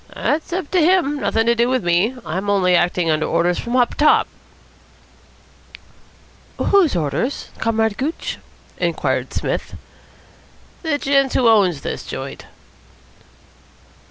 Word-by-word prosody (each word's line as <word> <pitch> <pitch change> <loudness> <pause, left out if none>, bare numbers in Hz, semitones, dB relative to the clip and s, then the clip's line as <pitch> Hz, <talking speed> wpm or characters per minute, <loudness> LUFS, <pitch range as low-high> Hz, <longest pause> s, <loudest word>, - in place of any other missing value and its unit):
"That's 310 +3 -1
up 345 -4 -3
to 370 - +3
him. 320 -3 +2
Nothing 225 -4 0
to 235 - +4
do 235 +1 +1
with 255 -4 0
me. 175 +8 +1
I'm 185 +6 -3
only 185 -3 +3
acting 175 -1 +1
under 155 0 0
orders 170 +1 +1
from 240 +1 -3
up 245 -2 +2
top." 300 - +3 2.3
"Whose 375 - +3
orders, 170 - -2
Comrade 220 -2 0
Gooch?" 300 +5 -3 0.4
inquired - - -1
Psmith. - - -3 1.1
"The 320 -4 -1
gent 275 -1 +1
who 245 - +3
owns 190 -9 +3
this - - -5
joint." - - -7
230 Hz, 125 wpm, -19 LUFS, 180-285 Hz, 2.3 s, to